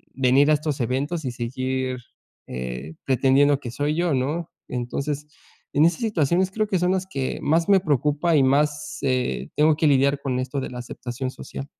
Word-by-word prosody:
venir 135 +2 +4
a - - +6
estos 150 -1 -3
eventos 140 +7 -1
y 125 - -1
seguir, 130 +2 -2 0.5
eh, 65 +5 -6
pretendiendo 135 +2 +3
que 125 - -6
soy 145 +5 -1
yo, 170 -1 +1
¿no?". 150 +6 -2 0.2
Entonces, 140 +4 -3 0.5
en 150 - +5
esas 170 -1 +1
situaciones 185 -3 +1
creo 215 +2 -1
que 190 -3 0
son 180 +1 +2
las 190 -1 -1
que 135 -8 -3
más 165 +2 +2
me 195 -1 +6
preocupa 150 +2 +1
y 140 - +5
más, 150 +2 +1
eh, 125 - -1
tengo 150 +1 +4
que 155 - +3
lidiar 140 0 +3
con 130 -2 -1
esto 130 +2 -3
de 135 - -4
la 125 - -7
aceptación 125 +1 -5
social. 135 - -8
140 Hz, 185 wpm, -24 LUFS, 130-155 Hz, 0.5 s, a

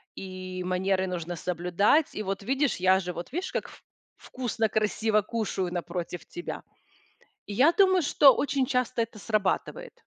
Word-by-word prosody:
и 185 -1 -6
манеры 185 +1 0
нужно 175 -1 -4
соблюдать. 180 - +1
И 215 - -3
вот, 195 +1 -3
видишь, 270 +2 0
я 185 +1 +4
же, 180 - -4
вот 175 +8 -8
видишь, 360 +3 -3
как - - -3
вк - - -16 0.3
вкусно, 230 -3 -2
красиво 215 0 +1
кушаю 205 -5 -3
напротив 175 0 -4
тебя. 350 - -7 0.8
И - - -6
я 260 +10 +5
думаю, 375 -2 +4
что 280 -2 +6
очень 275 -1 0
часто 250 -1 0
это 225 -2 -7
срабатывает. 215 - -1
210 Hz, 155 wpm, -27 LUFS, 185-255 Hz, 0.8 s, что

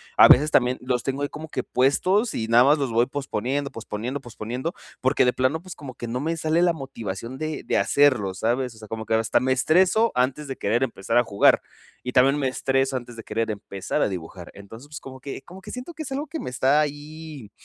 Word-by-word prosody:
a - - +9
veces 150 +3 +6
también 125 0 +3
los 125 -1 -1
tengo 135 +1 -2
ahí 145 - -1
como 155 +2 -8
que 130 - -3
puestos 185 - +2
y 110 - -2
nada 115 +2 +6
más 145 +3 +5
los 135 -4 -2
voy 115 +2 +3
posponiendo, 140 0 -2
posponiendo, 115 +5 -5
posponiendo 120 +6 -5 0.3
porque 130 0 +3
de 125 - +3
plano, 130 +5 0
pues, 185 0 -10
como 130 -4 -9
que 120 - -6
no 120 +2 -3
me 165 +3 -1
sale 160 +2 +1
la 175 -1 +4
motivación 120 -5 -6
de 155 -1 -4
de - - 0
hacerlo, 105 -2 +3
¿sabes? 120 +4 -1
O - - -17
sea, 110 -1 -11
como 110 +1 -5
que 110 - +1
hasta 110 0 +2
me 130 +1 0
estreso 185 - +3
antes 130 +4 0
de 135 - -4
querer 115 +5 +1
empezar 115 -2 -1
a 120 - +5
jugar. 100 -4 +4 0.4
Y 125 - -3
también 135 +2 +5
me 135 - +1
estreso 135 +1 0
antes 120 -1 -6
de 115 - -8
querer 115 -1 -2
empezar 100 -2 -4
a - - +3
dibujar. 90 -1 -7
Entonces 115 +9 -11
como 130 -1 -10
que 135 0 -7
como 185 +6 -13
que - - -9
siento 250 +7 -7
que 315 0 -6
es 275 - -8
algo 290 +3 -3
que 320 +3 -5
me - - -5
está 130 +3 +2
ahí 150 -4 -5
130 Hz, 230 wpm, -24 LUFS, 115-150 Hz, 0.4 s, a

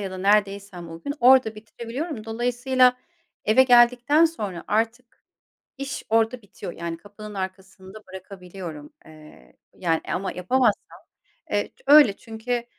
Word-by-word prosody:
ya 195 -2 -4
da 185 - -7
neredeysem 200 -2 0
o 165 0 -10
gün 285 - -3
orada 250 -3 +5
bitirebiliyorum. 230 +4 -7
Dolayısıyla 245 +2 +2 0.5
eve 220 +5 +5
geldikten 250 +5 +5
sonra 210 - -3
artık 230 +3 -2 0.6
iş 275 0 -5
orada 225 +2 +1
bitiyor. 200 -3 -9
Yani, 170 -1 -5
kapının 210 +3 -12
arkasında 190 +1 -8
bırakabiliyorum. 180 -5 -10
Eee, 155 - -17 0.2
yani, 165 -3 -1
eee, - - -6
ama 190 +1 -3
yapamazsam, 245 +9 0 0.5
eee, 205 0 -1 0.2
öyle. 285 -8 +7
Çünkü 235 +1 -4
215 Hz, 125 wpm, -24 LUFS, 190-245 Hz, 0.6 s, öyle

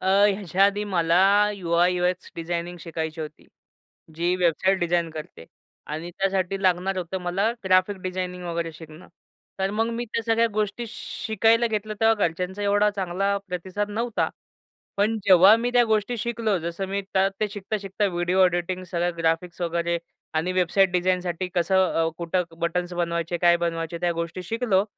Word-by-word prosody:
अ, - - -4 0.2
ह्याच्या 195 -2 +1
आधी 200 +1 +1
मला 170 -4 +2 0.4
यु-आय-यु-एक्स 180 0 +1
डिझायनिंग 170 +1 -4
शिकायची 160 -1 -4
होती, 155 -1 -8 0.7
जी 175 +2 +1
वेबसाईट 185 +2 +2
डिझाइन 175 -1 +1
करते 155 - -9 0.4
आणि 160 +3 -5
त्यासाठी 195 +1 -1
लागणार 185 +1 +1
होतं 180 +1 -3
मला 190 +5 0
ग्राफिक 185 +1 +3
डिझायनिंग 180 -1 -4
वगैरे 170 -1 -3
शिकणं, 160 +1 -13 0.5
तर 190 +1 0
मग 225 +2 0
मी 240 +1 -3
त्या 230 0 -3
सगळ्या 230 +1 +3
गोष्टी 215 +2 -1
शिकायला 225 +1 +1
घेतलं. 215 -1 -3
तेव्हा 225 0 +5
घरच्यांचा 180 +4 -5
एवढा 205 +1 +3
चांगला 195 0 -1
प्रतिसाद 190 +3 -3
नव्हता. 230 +1 -1 0.7
पण 215 +3 +2
जेव्हा 190 +2 +8
मी 240 +1 0
त्या 245 -1 +6
गोष्टी 220 +2 0
शिकलो, 225 -2 -1
जसं 170 +3 -4
मी 200 +1 -2
त - - +4 0.2
ते 215 - +1
शिकता-शिकता 205 0 -3
व्हिडिओ 175 0 0
ऑडिटिंग, 180 +1 0
सगळं 175 -1 -2
ग्राफिक्स 165 +2 -1
वगैरे 170 0 0 0.4
आणि 160 +3 0
वेबसाईट 185 +1 +3
डिझाइनसाठी 180 0 0
कसं, 175 +2 +2 0.2
अ, 165 0 +2
कुठं 175 +1 0 0.2
बटन्स 175 +1 -1
बनवायचे, 170 -1 -1
काय 175 0 +4
बनवायचे, 170 -1 -2
त्या 175 -1 +2
गोष्टी 170 +2 -4
शिकलो. 220 -1 +1
180 Hz, 155 wpm, -24 LUFS, 170-200 Hz, 0.7 s, जेव्हा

